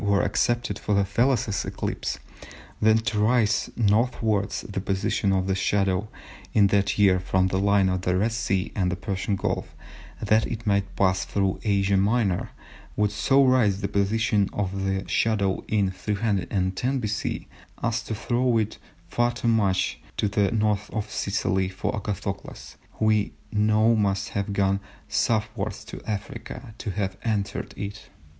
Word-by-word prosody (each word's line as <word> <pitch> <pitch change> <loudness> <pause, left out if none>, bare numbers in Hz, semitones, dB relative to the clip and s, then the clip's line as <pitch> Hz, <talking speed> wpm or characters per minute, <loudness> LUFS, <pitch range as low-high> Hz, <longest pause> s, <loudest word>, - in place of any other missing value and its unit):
were 100 -1 +2
accepted 120 -4 0
for 105 - 0
the 100 0 +3
Thales 115 0 +1
eclipse, - - -3 0.6
then 110 +1 +5
to 110 -1 -1
raise 110 0 +2
northwards 110 -2 +1
the 100 -1 -3
position 100 +1 0
of 95 -1 +1
the 95 - +1
shadow 95 +1 +1 0.5
in 105 - +5
that 100 -1 +2
year 95 -3 +5
from 95 0 +1
the 95 - 0
line 100 -1 +3
of 95 -1 0
the 90 0 +1
Red 110 +5 +1
Sea 100 -5 -1
and 90 -3 +1
the - - -1
Persian 95 +1 -2
Gulf, - - -3 0.4
that 110 +1 +2
it 115 0 -5
might 100 -1 0
pass 95 -1 +2
through 95 -2 -1
Asia 100 -2 +2
Minor, 100 -2 +1 0.5
would 105 -1 +1
so 135 +6 +3
raise 120 -7 +3
the - - 0
position 100 0 +1
of 95 -1 -2
the 95 0 -1
shadow 100 -4 +1
in 100 -3 +1
310 100 +3 -1
B.C. 105 -4 -3 0.4
as 115 -1 0
to 110 -1 -4
throw 120 +2 +1
it 110 -1 -1 0.3
far 120 +6 +1
too 120 0 -4
much 100 -5 +2 0.2
to - - +1
the 100 -1 +1
N. 110 -2 +1
of 105 0 -1
Sicily 95 -1 0
for 95 - -3
Agathocles, 100 -1 -5 0.2
who 110 - -1
we 110 -1 +2 0.2
know 110 +2 +3
must 100 -2 0
have 100 0 -2
gone 100 -1 +1 0.3
southwards 110 -2 -1
to - - -8
Africa, 110 +2 -6
to - - -4
have 95 -1 -2
entered 100 -4 -2
it. 100 +1 -6
100 Hz, 155 wpm, -25 LUFS, 95-110 Hz, 0.6 s, then